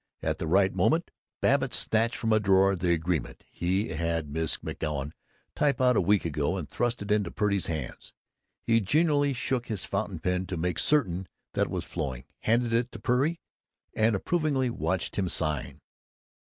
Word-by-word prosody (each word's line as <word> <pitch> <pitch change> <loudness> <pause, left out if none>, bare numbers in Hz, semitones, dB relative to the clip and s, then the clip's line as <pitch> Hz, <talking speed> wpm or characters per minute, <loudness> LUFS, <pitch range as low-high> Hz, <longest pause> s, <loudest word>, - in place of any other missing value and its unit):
At - - -1
the - - -3
right 95 +3 +3
moment 165 +2 +1 0.3
Babbitt 135 -1 +2
snatched 115 +1 +1
from 115 -1 0
a 110 - +5
drawer 95 -1 +4
the 90 -1 0
agreement 85 -1 -1
he 95 +3 0
had 80 - -4
had 85 -2 -1
Miss 80 +1 -1
McGoun 75 -2 -4 0.4
type 145 -2 +1
out 125 -1 +4
a - - +4
week 100 +1 +2
ago 75 +3 -1
and 85 -6 -4
thrust 120 -2 -1
it 100 - -5
into 105 -4 +2
Purdy's 100 -2 0
hands. 80 -7 -5 0.5
He 115 0 +4
genially 145 - +2
shook 125 0 -2
his 105 -4 -3
fountain - - -2
pen 90 0 -1
to 90 - -4
make 90 0 -1
certain 95 - +1 0.3
that - - +1
it - - -9
was - - -3
flowing, 65 -3 -4 0.2
handed 115 +1 +1
it 120 +2 +1
to - - -7
Purdy, 140 +7 +1 0.5
and 110 0 +2
approvingly 140 - 0
watched 95 -6 -2
him 95 -3 0
sign. 75 -3 -1
100 Hz, 175 wpm, -28 LUFS, 85-120 Hz, 0.5 s, a